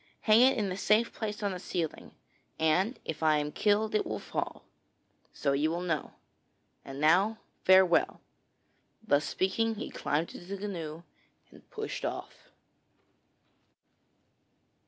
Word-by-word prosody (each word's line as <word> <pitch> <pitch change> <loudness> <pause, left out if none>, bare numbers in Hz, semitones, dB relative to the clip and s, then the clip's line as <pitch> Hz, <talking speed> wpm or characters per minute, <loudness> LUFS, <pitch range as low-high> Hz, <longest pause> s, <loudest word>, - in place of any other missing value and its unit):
Hang 215 +1 +5
it 260 +1 +5
in 205 -4 -1
a 185 - -4
safe 215 +3 +2
place 210 -2 -4
high - - -2
on 200 - 0
the 180 - -6
ceiling, 170 -3 -4 0.4
and 180 +9 +2
if 160 - -5
I 155 -1 +4
am 150 0 -2
killed, 210 +4 +1
it 215 - +2
will 110 - -4
fall. - - -5 0.7
So 140 - -1
you 145 +3 +1
will 170 +2 -2
know. 165 -5 -2 0.7
And 135 0 -8
now 185 +9 +4 0.3
farewell.' 185 -2 +5 0.8
Thus 145 -8 +2
speaking 225 +4 0
he 215 - -6
climbed 155 +3 -2
into 175 - -11
the 200 +1 -4
canoe 170 -5 -6 0.5
and - - -18
pushed 435 0 -5
off. - - -6
185 Hz, 140 wpm, -30 LUFS, 155-210 Hz, 0.8 s, Hang